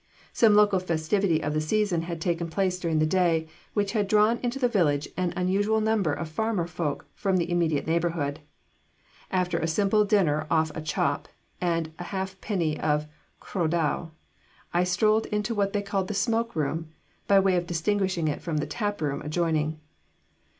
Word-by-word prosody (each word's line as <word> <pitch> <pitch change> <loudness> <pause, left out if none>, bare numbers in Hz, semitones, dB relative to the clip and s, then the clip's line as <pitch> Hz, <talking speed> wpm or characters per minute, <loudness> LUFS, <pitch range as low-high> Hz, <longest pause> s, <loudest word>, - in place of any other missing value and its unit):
Some 220 -3 +5
local 205 -2 +5
festivity 170 0 0
of 150 - -1
the 155 - +1
season 190 +1 +1
had 170 0 -5
taken 170 0 -1
place 185 +1 0
during 165 -3 0
the 155 - +3
day, 165 -1 +2 0.3
which 205 -2 +1
had 210 -3 0
drawn 215 +3 +3
into 245 +1 -2
the 255 -2 +2
village 150 -10 +1
an 180 -1 0
unusual 200 +4 +1
number 215 -6 +1
of 145 +3 -3
farmer 205 +2 -1
folk 165 -4 -3
from 190 -2 0
the 175 0 -1
immediate 165 -4 +1
neighbourhood. 165 -3 -1 0.9
After 180 -2 0
a 160 - -1
simple 200 +5 +3
dinner 170 -8 +2
off 160 -1 +2
a 160 - -5
chop 145 -2 -1 0.3
and 165 -2 -1
a 175 - -5
half 190 0 -4
pint 170 -8 -1
of 150 -1 +1 0.4
cwrw 175 -5 -1
da, 165 0 0 0.7
I 175 +1 +3
strolled 215 +5 +2
into 210 +2 -1
what 200 -2 0
they 205 0 -1
called 195 -2 -1
the 210 - -4
smoke 230 +2 0
room, 160 +1 -2 0.4
by 200 -1 +6
way 190 -1 +3
of 175 -1 -1
distinguishing 185 0 0
it 150 - -2
from 165 -3 -2
the 150 - 0
tap 205 -6 -3
room 140 -2 -1
adjoining. 155 0 -1
175 Hz, 180 wpm, -26 LUFS, 160-205 Hz, 0.9 s, by